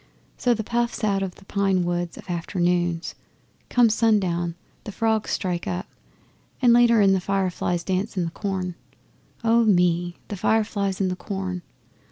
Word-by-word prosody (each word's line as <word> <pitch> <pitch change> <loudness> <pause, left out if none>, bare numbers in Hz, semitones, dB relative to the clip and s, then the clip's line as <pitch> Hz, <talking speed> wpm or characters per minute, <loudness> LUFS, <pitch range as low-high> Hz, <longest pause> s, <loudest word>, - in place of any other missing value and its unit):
So's 245 -3 +1
the 220 - -2
puffs 235 +1 -1
out 200 -2 +1
of 190 -2 -3
the 195 - -18
pine 195 -2 +1
woods 175 0 -2
of - - -11
afternoons. 175 -1 -1 0.6
Come 245 -1 +5
sundown, 185 -7 +1 0.3
the - - -6
frogs 220 +1 0
strike 180 -3 -2
up, 180 +2 -2 0.7
and 245 -3 +5
later 235 -2 +5
on 195 -1 +5
the 190 - +2
fireflies 185 -2 -1
dance 190 +4 -2
in 175 - +1
the 165 - -4
corn. 185 -2 -3 0.7
Oh 230 +1 +4
me, 175 -4 +2
the 205 - -3
fireflies 200 -1 0
in 190 - +2
the 180 - -2
corn! 185 -2 -4
190 Hz, 160 wpm, -24 LUFS, 175-215 Hz, 0.7 s, Come